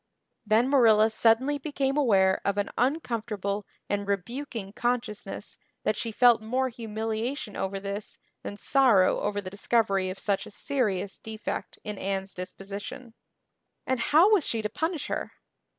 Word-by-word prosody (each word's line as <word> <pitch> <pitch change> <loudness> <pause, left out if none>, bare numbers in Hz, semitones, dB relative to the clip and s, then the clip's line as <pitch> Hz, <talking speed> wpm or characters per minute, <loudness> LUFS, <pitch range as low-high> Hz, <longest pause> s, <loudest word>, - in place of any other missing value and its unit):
Then 225 +4 +4
Marilla 225 -5 +5
suddenly 235 +6 +3
became 275 -2 -1
aware 195 -9 +3
of 200 0 0
an 205 - -1
uncomfortable 225 - -1 0.2
and 205 0 -2
rebuking 205 +1 -3
consciousness 240 -3 -3 0.3
that - - +1
she 230 - -2
felt 240 0 +5
more 255 +4 0
humiliation 225 +1 -4
over 195 +1 -2
this 200 +1 -5 0.2
than 205 - -6
sorrow 240 -7 +4
over 205 0 -1
the 185 -1 -7
discovery 200 -2 +1
of 185 - -5
such 200 -1 -1
a - - -9
serious 205 -6 -1
defect 220 0 -5
in 210 -2 -5
Anne's 195 0 -3
disposition. 200 +7 -7 0.7
And 260 -1 0
how 320 - +5
was 390 -7 +4
she 225 -4 -1
to 210 - -1
punish 320 - -2
her? - - -3
220 Hz, 145 wpm, -27 LUFS, 200-255 Hz, 0.7 s, Marilla